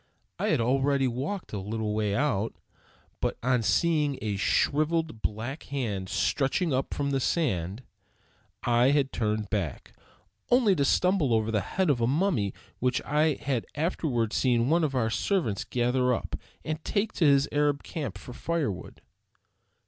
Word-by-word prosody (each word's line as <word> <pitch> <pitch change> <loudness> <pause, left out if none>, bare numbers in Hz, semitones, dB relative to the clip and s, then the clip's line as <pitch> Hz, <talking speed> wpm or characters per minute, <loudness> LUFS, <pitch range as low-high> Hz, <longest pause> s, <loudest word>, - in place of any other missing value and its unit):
I - - 0
had - - +2
already 135 +3 +2
walked 135 - -4
a 105 - -2
little 105 +2 -3
way 105 -1 0
out, 115 -5 0 0.6
but - - -1
on 125 -1 +2
seeing 145 - +2
a 105 -2 -2
shriveled 155 - +1
black 115 +8 -3
hand 105 -9 -3
stretching 135 - +1
up 130 +1 -1
from 140 -1 -1
the 135 - +1
sand, 115 - -1 0.8
I 120 +1 +4
had 140 -2 +2
turned 105 -2 -1
back; 95 - -3 0.6
only 240 -6 +4
to 140 - +1
stumble 180 - +3
over 110 0 0
the 105 -2 +1
head 180 - +1
of 120 -4 0
a 115 - +3
mummy 140 - +1 0.3
which 125 +1 +1
I 150 +1 +2
had 130 -5 -2
afterward 140 - -1
seen 125 0 +2
one 170 +1 +3
of 140 -3 0
our 115 -3 +1
servants 135 - 0
gather 125 +1 +1
up - - -5 0.3
and 155 0 -3
take 205 +1 -1
to 165 - +1
his 140 0 +5
Arab 145 -1 +1
camp 135 - -5
for 125 - -10
firewood. 140 - -3
130 Hz, 155 wpm, -28 LUFS, 110-150 Hz, 0.8 s, his